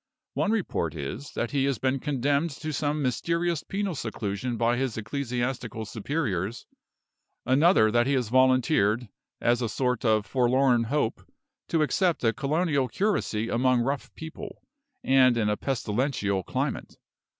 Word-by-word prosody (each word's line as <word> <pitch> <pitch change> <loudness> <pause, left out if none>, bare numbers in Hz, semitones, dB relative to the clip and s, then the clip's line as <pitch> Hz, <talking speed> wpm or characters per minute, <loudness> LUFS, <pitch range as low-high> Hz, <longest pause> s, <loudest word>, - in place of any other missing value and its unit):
One - - 0
report 180 - -1
is, 80 - -5
that 120 - -2
he 135 -2 +1
has 140 -3 0
been 130 +1 0
condemned 145 +3 0
to 155 0 -3
some 145 +1 -1
mysterious 170 +6 0
penal 200 -1 -3
seclusion 110 -2 -3
by 120 +1 +2
his 130 -3 -2
ecclesiastical 120 -1 -3
superiors 110 - -3 0.8
another, 130 - +4
that 120 +2 +2
he 140 - +2
has 125 -5 0
volunteered, 125 -3 +3 0.3
as 120 +1 +2
a 115 - -1
sort 125 +2 -1
of 110 -3 +2
Forlorn 125 +1 +2
Hope, 130 -1 -1 0.5
to 160 -2 +2
accept 175 +1 +1
a 115 -1 +3
colonial 140 - 0
curacy 120 - -1
among 125 +1 +2
rough 135 +3 -2
people, 170 +6 -9 0.4
and 130 -2 +4
in 105 -2 +1
a 105 - +1
pestilential 115 -5 -1
climate. - - -3
130 Hz, 140 wpm, -27 LUFS, 115-145 Hz, 0.8 s, another